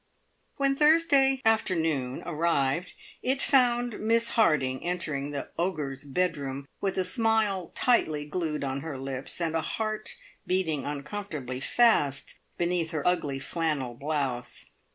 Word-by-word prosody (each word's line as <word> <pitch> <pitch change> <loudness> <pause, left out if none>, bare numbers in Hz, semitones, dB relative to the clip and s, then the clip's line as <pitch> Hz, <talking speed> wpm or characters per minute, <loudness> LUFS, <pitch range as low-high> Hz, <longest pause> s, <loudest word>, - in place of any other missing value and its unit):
When 275 -1 +2
Thursday 285 -3 +4
afternoon 160 - +1
arrived, 165 -1 0 0.3
it 260 +2 0
found 245 -4 +3
Miss 230 +2 +2
Harding 140 - +2
entering 155 -5 -2
the 145 -2 -5
ogre's 145 -6 -2
bedroom 140 -3 -2
with 195 -1 -1
a 185 - +2
smile 210 -2 +1
tightly 155 - +2
glued 150 -1 -2
on 135 0 -2
her 155 -3 -5
lips, 135 +2 -4
and 165 -2 -1
a 165 - +2
heart 215 +6 -3 0.3
beating 165 -7 0
uncomfortably 145 -3 -5
fast 145 - +2 0.2
beneath 175 -1 0
her 155 -2 -2
ugly 150 -6 +1
flannel 145 -3 -2
blouse. 135 -3 -3
165 Hz, 125 wpm, -28 LUFS, 140-215 Hz, 0.3 s, Thursday